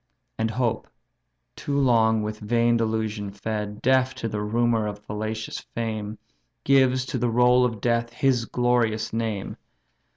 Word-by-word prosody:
And 110 Hz, 0 st, +1 dB
hope, 115 Hz, 0 st, -1 dB, 0.7 s
too 140 Hz, -1 st, -3 dB
long 110 Hz, -5 st, +3 dB
with 105 Hz, 0 st, -4 dB
vain 115 Hz, +2 st, +2 dB
delusion 110 Hz, -2 st, -1 dB
fed, 105 Hz, +1 st, -5 dB
Deaf 130 Hz, 0 st, +3 dB
to 120 Hz, -3 st, -4 dB
the 105 Hz, -1 st, -3 dB
rumour 115 Hz, +1 st, +1 dB
of 105 Hz, -1 st, -5 dB
fallacious 110 Hz, +1 st, -5 dB
fame, 110 Hz, -2 st, -5 dB, 0.5 s
Gives 130 Hz, -1 st, +3 dB
to -, -, -3 dB
the 120 Hz, -, +1 dB
roll 125 Hz, +2 st, +4 dB
of 115 Hz, -4 st, -1 dB
death 115 Hz, -1 st, 0 dB
his 125 Hz, -2 st, +1 dB
glorious 115 Hz, -3 st, 0 dB
name! 110 Hz, -3 st, -3 dB
115 Hz, 140 wpm, -25 LUFS, 110-125 Hz, 0.7 s, roll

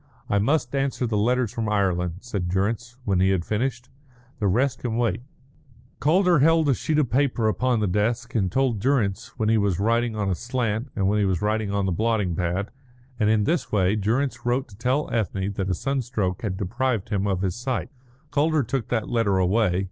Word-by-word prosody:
"I 100 Hz, -, +3 dB
must 125 Hz, +3 st, +1 dB
answer 135 Hz, -2 st, 0 dB
the 110 Hz, -2 st, -1 dB
letters 120 Hz, +1 st, +1 dB
from 110 Hz, -2 st, -2 dB
Ireland," 90 Hz, -4 st, +1 dB
said 100 Hz, -8 st, -3 dB
Durrance, 115 Hz, +6 st, -1 dB
when 95 Hz, -3 st, +1 dB
he 95 Hz, +1 st, +4 dB
had 95 Hz, -3 st, 0 dB
finished. 120 Hz, +3 st, -2 dB, 0.5 s
"The 105 Hz, -, +1 dB
rest 125 Hz, +8 st, +1 dB
can 115 Hz, -2 st, -2 dB
wait." 120 Hz, 0 st, 0 dB, 0.8 s
Calder 175 Hz, +1 st, +4 dB
held 160 Hz, +1 st, +4 dB
a -, -, +5 dB
sheet 150 Hz, +4 st, -1 dB
of 145 Hz, -6 st, +1 dB
paper 125 Hz, -4 st, +2 dB
upon 120 Hz, +1 st, +1 dB
the -, -, +2 dB
desk 115 Hz, +6 st, -1 dB
and 95 Hz, -6 st, 0 dB
told 130 Hz, -5 st, +1 dB
Durrance 110 Hz, -5 st, 0 dB
when 110 Hz, -, 0 dB
he 110 Hz, 0 st, +3 dB
was 100 Hz, -4 st, 0 dB
writing 115 Hz, +2 st, +1 dB
on 105 Hz, -2 st, -1 dB
a 95 Hz, -, +1 dB
slant 120 Hz, +2 st, -2 dB
and 95 Hz, -2 st, +1 dB
when 105 Hz, +2 st, +2 dB
he 105 Hz, -, +2 dB
was 95 Hz, -1 st, 0 dB
writing 105 Hz, 0 st, 0 dB
on 100 Hz, -1 st, 0 dB
the 95 Hz, -, 0 dB
blotting 105 Hz, -2 st, 0 dB
pad; 90 Hz, +4 st, -2 dB, 0.5 s
and 105 Hz, -2 st, +3 dB
in 110 Hz, -1 st, +3 dB
this 170 Hz, +9 st, 0 dB
way 100 Hz, -1 st, +2 dB
Durrance 120 Hz, +4 st, -1 dB
wrote 125 Hz, +2 st, 0 dB
to 100 Hz, -, -14 dB
tell 125 Hz, +7 st, 0 dB
Ethne 100 Hz, -3 st, -1 dB
that 95 Hz, -1 st, -2 dB
a 95 Hz, -, +1 dB
sunstroke 120 Hz, -7 st, -2 dB
had 100 Hz, -4 st, -3 dB
deprived 110 Hz, +2 st, -1 dB
him 100 Hz, -2 st, 0 dB
of 95 Hz, -1 st, -1 dB
his 95 Hz, -2 st, -1 dB
sight. 125 Hz, +1 st, -3 dB, 0.4 s
Calder 150 Hz, +1 st, +2 dB
took 120 Hz, 0 st, -2 dB
that 115 Hz, -3 st, -1 dB
letter 115 Hz, -5 st, +1 dB
away. 95 Hz, 0 st, +2 dB
110 Hz, 205 wpm, -24 LUFS, 100-125 Hz, 0.8 s, a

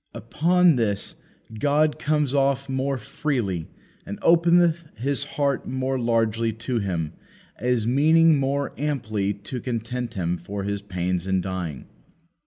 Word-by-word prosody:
Upon 175 Hz, -1 st, +3 dB
this 105 Hz, -4 st, 0 dB, 0.5 s
God 150 Hz, +3 st, +2 dB
comes 150 Hz, -2 st, +1 dB
off 140 Hz, -1 st, +1 dB
more 135 Hz, +1 st, -1 dB
freely, 105 Hz, -, -2 dB, 0.4 s
and 100 Hz, -, -6 dB
openeth 170 Hz, 0 st, +4 dB
His 140 Hz, +5 st, -1 dB
heart 140 Hz, -2 st, 0 dB
more 130 Hz, 0 st, -1 dB
largely 115 Hz, -1 st, +1 dB
to 115 Hz, +2 st, -2 dB
Him, 85 Hz, -6 st, -2 dB, 0.5 s
as 120 Hz, -2 st, +1 dB
meaning 155 Hz, +5 st, +5 dB
more 140 Hz, +1 st, -1 dB
amply 110 Hz, -9 st, -1 dB
to 105 Hz, +5 st, -6 dB
content 120 Hz, 0 st, -4 dB
Him 90 Hz, -2 st, -1 dB
for 100 Hz, +2 st, -5 dB
His 100 Hz, 0 st, -2 dB
pains 90 Hz, -2 st, -2 dB
in 95 Hz, 0 st, +2 dB
dying. 90 Hz, -6 st, -4 dB
125 Hz, 130 wpm, -24 LUFS, 100-140 Hz, 0.5 s, meaning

